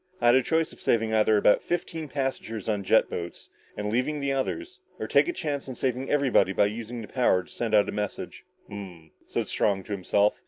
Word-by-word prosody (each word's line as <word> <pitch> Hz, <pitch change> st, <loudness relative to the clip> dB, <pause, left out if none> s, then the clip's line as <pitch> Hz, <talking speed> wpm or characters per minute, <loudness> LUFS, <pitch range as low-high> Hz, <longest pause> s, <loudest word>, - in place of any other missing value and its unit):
"I 120 Hz, -, -1 dB
had 120 Hz, -, +7 dB
a 130 Hz, -, +5 dB
choice 160 Hz, +4 st, 0 dB
of -, -, -16 dB
either -, -, -13 dB
saving 110 Hz, -1 st, +2 dB
about 105 Hz, -1 st, +4 dB
fifteen 165 Hz, -2 st, -3 dB
passengers 130 Hz, -6 st, -3 dB
on 105 Hz, -2 st, +1 dB
the 100 Hz, -, -8 dB
jet 110 Hz, -, +5 dB
boats, 85 Hz, 0 st, -7 dB, 0.3 s
and 105 Hz, 0 st, -2 dB
leaving 130 Hz, +6 st, 0 dB
the 140 Hz, -1 st, 0 dB
others, 335 Hz, -, -3 dB, 0.2 s
or -, -, -4 dB
take -, -, +4 dB
a -, -, +1 dB
chance 145 Hz, -, -4 dB
on 130 Hz, -, -5 dB
saving 130 Hz, +2 st, -2 dB
everybody 130 Hz, -9 st, +3 dB
by 100 Hz, -, +4 dB
using 115 Hz, +2 st, -5 dB
the -, -, -9 dB
power 105 Hz, -8 st, +2 dB
to -, -, -17 dB
send 115 Hz, -2 st, -1 dB
out 105 Hz, -, +5 dB
a -, -, -2 dB
message." 105 Hz, -1 st, -5 dB, 0.2 s
"Ummmmh," 90 Hz, -6 st, -9 dB, 0.2 s
said -, -, -2 dB
Strong 100 Hz, -2 st, +1 dB
to 105 Hz, -, -11 dB
himself. 100 Hz, +1 st, +2 dB
115 Hz, 225 wpm, -27 LUFS, 105-135 Hz, 0.3 s, had